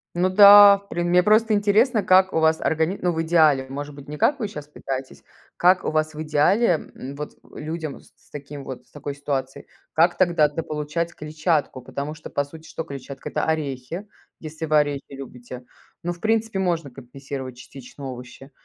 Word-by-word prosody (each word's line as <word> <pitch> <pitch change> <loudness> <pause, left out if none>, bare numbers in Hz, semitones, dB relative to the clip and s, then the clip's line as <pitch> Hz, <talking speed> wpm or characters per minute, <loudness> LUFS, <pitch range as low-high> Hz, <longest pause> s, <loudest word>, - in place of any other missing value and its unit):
Ну 180 +2 +1
да, 200 +1 +9
в 200 0 -23
при 175 - -3
мне 175 +1 +3
просто 215 +3 +3
интересно, 215 +3 +3
как 190 0 +4
у 160 - +1
вас 160 0 +3
органи 160 +4 0
ну, 175 -1 +1
в 160 - -2
идеале, 155 -5 +3
может 145 +2 -6
быть, 140 0 -13
не 150 - -6
как 285 - +1
вы 215 - -2
щас 150 -6 -8
пытаетесь. 135 -2 -7 0.4
Как 180 +1 +4
у - - -1
вас 155 0 -1
в 155 - -5
идеале, 160 +5 +2
м, 135 +2 -8
вот 150 +1 -6 0.2
людям 155 -1 -6
с - - -21
с - - -28
таким 145 -1 -9
вот, 130 -2 -8
с - - -30
такой 145 -1 -6
ситуацией, 135 -2 -4 0.3
как 170 +3 +3
тогда 170 -5 +3
дополучать 155 +2 -4
клетчатку? 150 -3 -2
Потому 140 +4 -5
что, 160 - -11
по 145 - -1
сути, 160 +3 -13
что 165 - -5
клетчатка? 140 -2 -8
Это - - -2
орехи, 155 +3 -3 0.3
если 160 +1 -7
вы 155 0 +3
орехи 145 -2 0
любите. 125 -2 -10 0.4
Ну, 175 +1 -2
в 175 - -13
принципе, 220 -1 0
можно 170 -6 -1
компенсировать 130 0 -8
частично 135 +2 -12
овощи. 125 +2 -11
155 Hz, 190 wpm, -23 LUFS, 140-175 Hz, 0.4 s, да